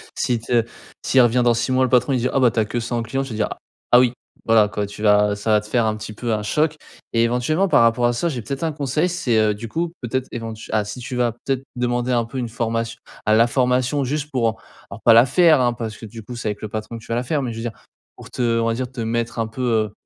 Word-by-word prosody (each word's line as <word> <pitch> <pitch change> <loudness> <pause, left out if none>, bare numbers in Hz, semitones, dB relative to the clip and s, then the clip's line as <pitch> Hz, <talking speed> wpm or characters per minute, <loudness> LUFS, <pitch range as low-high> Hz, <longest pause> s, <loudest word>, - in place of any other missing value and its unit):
s'il 120 -2 0
te 115 +1 +1 0.4
s'il 130 - +3
revient 120 +1 +3
dans 120 -1 +3
6 125 - -1
mois 130 0 +3
le 130 - +1
patron, 125 +2 +3
il 130 - +1
dire: 125 +2 0
«Ah - - +4
bah, 125 -3 +4
tu 110 - -1
as 110 - +2
que 120 +3 -3
ça 115 +1 -4
en 120 - 0
clients», 135 +4 -2
tu 135 - -8
vas - - -4
dire 105 -1 0 0.4
«Ah 120 - +8
oui». 125 -1 +3 0.3
Voilà 110 -2 +5
quoi, 105 0 -3
tu 100 - -10
vas 105 -1 +4
ça 105 +2 -2
va 105 -1 +4
te 105 - -13
faire, 120 +2 +1
heu, - - +1
un 110 - -2
petit 110 0 -7
peu 115 +2 -3
un 105 -1 -2
choc 150 +8 +1 0.4
et 115 0 +3
éventuellement, 125 +11 +1
par 180 - +4
rapport 115 +1 +3
à 120 - +3
ça. 170 +8 -1
J'ai 130 -6 -4
peut-être 135 +8 -5
un 165 - 0
conseil. 150 +3 -1
C'est 130 -10 0
heu, 110 -1 +3
du 115 +3 -7
coup, 165 +8 -3
peut-être, 130 +2 -2
éventue 115 -1 -7
ah! 110 -1 +1
Si 115 - -7
tu 125 +1 -5
vas 120 -2 +1
peut-être 130 +2 -3
demander 120 0 -1
un 120 -1 +2
peu 115 +4 -8
une 125 -2 -2
formation 115 0 -2 0.3
à 110 - +3
la 115 +2 +5
formation, 125 +2 +1
juste 150 +3 -3
pour 115 -4 0 0.3
alors, - - -9
pas 115 - +7
la 115 +2 +7
faire, 155 +3 +5
hein, 120 -1 +2
parce 110 -2 -6
que - - -10
du 110 +1 -10
coup 120 +4 -8
c'est 120 - -5
avec 105 - -5
le 110 - -5
patron 110 +2 -5
que 115 - -13
tu - - -16
vas - - +1
la 120 - -1
faire. 145 +3 -1
Mais, 125 -3 -3
je 115 - -8
veux - - -4
dire, 120 - -3 0.4
pour - - -12
te - - -4
heu, 115 -1 +2
on - - 0
va 115 - +1
dire 125 +1 -3
te 125 -2 -6
mettre 115 +1 -2
un 115 - +1
peu, 110 +4 -7
heu, 110 -4 +1
120 Hz, 305 wpm, -21 LUFS, 115-130 Hz, 0.4 s, Ah